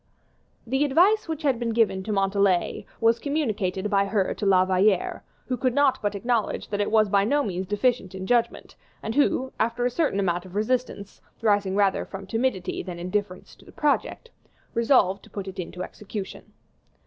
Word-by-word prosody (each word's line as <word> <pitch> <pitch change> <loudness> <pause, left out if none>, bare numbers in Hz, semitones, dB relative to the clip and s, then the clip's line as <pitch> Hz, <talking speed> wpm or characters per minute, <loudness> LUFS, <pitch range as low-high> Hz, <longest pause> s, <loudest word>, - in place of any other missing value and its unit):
The 265 +4 +1
advice 360 +10 +3
which 320 -1 -4
had 270 -5 +1
been 235 -2 -1
given 220 -4 +2
to 215 - -3
Montalais 195 -2 +1
was 230 0 +3
communicated 215 -10 -1
by 200 -1 +3
her 195 -1 0
to 210 - -5
La 185 -1 +5
Valliere, 190 +1 +1 0.2
who 255 - -2
could 250 +1 -1
not 275 -2 +3
but 205 -1 -1
acknowledge 230 +1 -1
that 205 0 -1
it 205 - 0
was 215 -1 +4
by 200 0 +3
no 285 +7 +2
means 185 -4 -3
deficient 205 -2 0
in 190 0 -5
judgment, 235 +1 0 0.3
and 220 - -3
who, 265 -2 +1
after 235 +2 0
a 250 - +1
certain 280 -7 0
amount 175 -2 0
of 185 0 -13
resistance, 215 -2 -2 0.2
rising 205 -3 +2
rather 200 -1 +2
from 195 0 -8
timidity 225 -3 -1
than 180 -2 -7
indifference 185 +1 -4
to - - -19
the - - -15
project, 300 +10 -1 0.4
resolved 230 -5 +3
to - - -17
put 200 -2 -6
it 190 0 -7
into 180 +1 -5
execution. 205 0 -8
210 Hz, 185 wpm, -25 LUFS, 195-250 Hz, 0.4 s, La